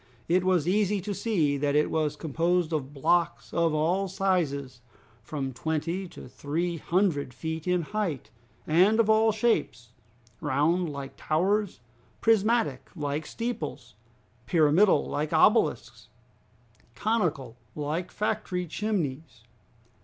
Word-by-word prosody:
It 180 +2 +2
was 180 -4 +2
easy 205 +1 +2
to 205 +3 -4
see 170 -10 0
that 145 0 0
it 150 - +2
was 155 -2 0
composed 165 +2 0
of 140 -3 -2
blocks 170 +4 0
of 170 -1 +2
all 175 +6 +1
sizes, 160 - -1 0.4
from 135 -3 -4
twenty 160 +7 -2
to - - -11
three 165 +7 -3
hundred 165 -8 0
feet 160 +5 -5
in 180 -1 +1
height, 160 - -3 0.3
and 185 +8 +4
of 220 -1 +4
all 220 +1 +4
shapes, 210 - 0 0.5
round 160 +4 +1
like 140 -1 -7
towers, 190 - 0 0.4
prismatic 225 - +2
like 150 -1 -3
steeples, 220 - -5 0.5
pyramidal 165 - +4
like 150 +1 -3
obelisks, - - +2 0.9
conical 170 - -1 0.2
like 155 +4 -3
factory 210 -4 -2
chimneys. 165 -6 -3
165 Hz, 115 wpm, -27 LUFS, 145-195 Hz, 0.9 s, and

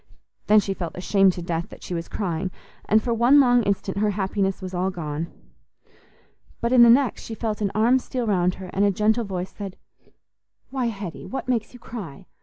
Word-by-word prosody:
Then 215 0 +7
she 195 -1 -2
felt 175 -3 -6
ashamed 195 +1 +3
to 175 - -6
death 170 -1 -3
that - - -13
she - - -5
was 165 -1 -3
crying, 185 -2 -2 0.4
and 215 +1 +3
for 240 - 0
one 240 +5 +5
long 245 -3 +5
instant 200 -2 -1
her 210 0 +2
happiness 195 -1 -1
was 185 -1 -7
all 185 +1 0
gone. 160 -3 -4 1.3
But 235 - -1
in 250 - +7
the 235 - +9
next 255 +2 +4
she 225 - -6
felt 220 -2 -3
an 200 - +1
arm 235 +4 +4
steal 250 -1 -4
round 180 -4 +1
her, 185 -1 -9
and 195 - +2
a 205 - +5
gentle 215 +4 +1
voice 185 -2 -4
said, 195 -2 -7 0.9
"Why, 260 -3 -1
Hetty, 200 -6 -6
what 265 - -5
makes 230 -4 -1
you - - -12
cry? 195 - -8
200 Hz, 205 wpm, -24 LUFS, 185-230 Hz, 1.3 s, the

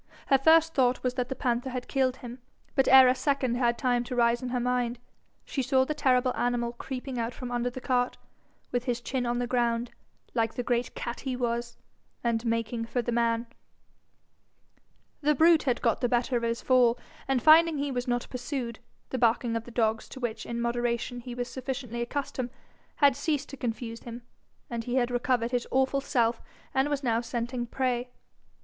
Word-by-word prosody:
Her 270 - +5
first 325 +3 +5
thought 255 -2 +2
was 250 -1 0
that 250 -1 -2
the 265 - -3
panther 245 0 -1
had 250 -1 -5
killed 260 -2 +1
him, 245 0 -9 0.3
but 270 -2 +2
ere 265 0 +9
a 250 - +5
second 260 -1 0
had 240 -1 +1
time 245 -2 +1
to 250 - -4
rise 235 0 +3
in 255 - -4
her 250 0 -1
mind, 245 -1 0 0.5
she 270 - -2
saw 260 0 +3
the 305 - -2
terrible 255 -3 +2
animal 240 -1 0
creeping 255 +1 -5
out 230 +1 -2
from 250 -1 -6
under 245 0 0
the 245 - -7
cart, 250 -1 0 0.5
with 245 0 -1
his 245 -2 -1
chin 245 0 -2
on 240 0 0
the 245 - 0
ground, 240 -1 0 0.4
like 225 -2 0
the 245 - -2
great 240 0 -1
cat 235 - -4
he 265 -2 -3
was, 235 -1 -2 0.5
and 230 -1 0
making 230 0 -1
for 240 +1 -2
the 240 - -2
man. 230 0 +1 1.8
The 300 0 +3
brute 325 +2 +6
had 245 - -1
got 230 +1 +2
the 245 - +1
better 245 +1 +1
of 240 - +1
his 230 0 -2
fall, 250 -2 +4 0.3
and 270 -1 +2
finding 315 +3 +6
he 285 0 -1
was 245 -1 -3
not 245 -1 0
pursued, 250 -2 -4 0.3
the 260 - -2
barking 230 0 +2
of 230 0 -3
the - - -10
dogs, 225 -2 0
to 265 - -9
which 225 -3 -4
in 235 0 -3
moderation 240 +1 -1
he 245 0 -7
was 245 0 -3
sufficiently 250 -3 -5
accustomed, 255 0 -3 0.5
had 280 -3 +4
ceased 295 0 -1
to 275 - -7
confuse 230 -1 -4
him, 235 0 -9 0.6
he 245 +2 -3
had 250 -1 +2
recovered 245 -1 0
his 245 -1 -1
awful 265 +1 +2
self, 235 -3 +1 0.3
and 270 +2 +2
was 290 -1 -1
now 230 -2 +1
scenting 240 +1 -3
prey. 250 -1 -1
245 Hz, 195 wpm, -28 LUFS, 235-260 Hz, 1.8 s, ere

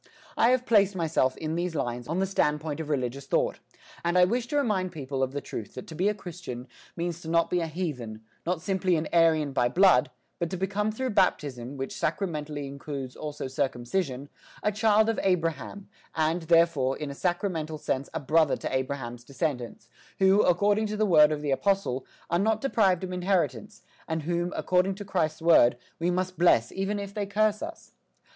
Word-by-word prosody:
I 230 - +4
have 250 0 +2
placed 200 -4 +4
myself, 160 -6 +1
in 155 0 -3
these 170 0 -2
lines, 120 -4 -3
on 165 +4 -2
the 190 - +2
standpoint 150 -5 0
of 155 -2 -5
religious 135 -1 -2
thought, - - 0 0.4
and 170 +1 +1
I 180 - +7
wish 240 +5 -1
to 290 - -1
remind 200 -9 0
people 135 -3 -4
of 130 -1 0
the 145 +1 -4
truth 105 - -7
that 125 - -7
to - - -10
be 185 +6 +1
a 210 - -1
Christian 170 -10 -8 0.3
means 170 0 -3
to 160 - -9
be - - -3
not 170 +1 +2
a 175 -2 +1
heathen, 130 -10 -5 0.2
not 170 -1 -2
simply 190 -2 +1
an 155 -1 -1
Aryan 160 -4 +3
by 120 -2 +2
blood, 180 -8 +5 0.3
but 170 - -1
to 185 - -4
become 205 +3 -1
through 255 +3 -3
baptism, 145 - 0
which 135 0 -4
sacramentally 150 -4 -2
includes 140 -1 -6
also 150 -3 -5
circumcision, 135 +2 -2 0.4
a 210 - +2
child 215 +1 +3
of 225 - 0
Abraham, 180 +1 -1 0.3
and, 160 +2 +1
therefore, 160 -5 +3
in 150 -2 -5
a - - -5
sacramental 170 -1 -2
sense 135 -2 -2
a - - -3
brother 155 +1 +2
to - - -3
Abraham's 130 -3 -3
descendants, 125 -4 -4 0.3
who, 190 +2 +5
according 205 +4 +3
to 210 0 -4
the 215 - +2
word 155 -5 +6
of 150 -1 -3
the 145 - -1
apostle, 135 -5 0 0.2
are 170 - +1
not 220 +2 +2
deprived 195 -9 +2
of 185 - -4
inheritance, 175 - -1 0.2
and 160 -1 -2
whom, 175 +2 -1
according 185 +1 +1
to 205 +1 -8
Christ's 165 -4 -1
word, 125 -8 +6 0.2
we 170 +2 +1
must 185 0 -2
bless 125 -10 +4
even 195 +2 -2
if 200 -1 -6
they 205 -1 -3
curse 210 +1 +1
us. 330 +1 -8
165 Hz, 195 wpm, -27 LUFS, 140-195 Hz, 0.4 s, I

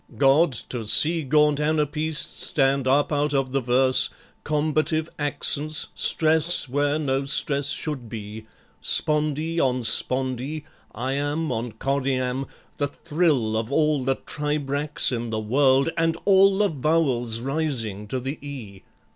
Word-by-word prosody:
God! 140 +2 +4 0.2
to 115 -4 -5
see 165 +9 +3
Gaunt 150 +1 +2
anapaests 155 +1 -1
stand 135 -2 +1
up 140 +4 +2
out 145 0 0
of 135 -1 0
the 135 0 0
verse, 130 +1 +3 0.3
Combative 155 +1 0
accents, 145 +1 0
stress 160 0 +2
where 145 +3 0
no 135 -2 -1
stress 140 0 +2
should 135 -7 -2
be, 110 0 -8 0.4
Spondee 155 +2 +1
on 130 -3 0
spondee, 130 +5 0 0.3
iamb 145 +6 -2
on 115 -1 -4
choriamb, 130 +1 -2 0.3
The 145 - 0
thrill 145 -8 0
of 110 0 -2
the 140 - -3
all 150 -3 +1
the 135 +1 +1
tribrachs 150 0 -2
in 120 -1 -3
the 110 -1 -2
world, 135 +5 +2
And 165 0 0
all 195 0 +5
the 205 0 +2
vowels 135 -7 0
rising 125 -7 -3
to 130 +5 -3
the 135 +4 -5
E! 115 -10 -9
140 Hz, 135 wpm, -23 LUFS, 130-155 Hz, 0.4 s, all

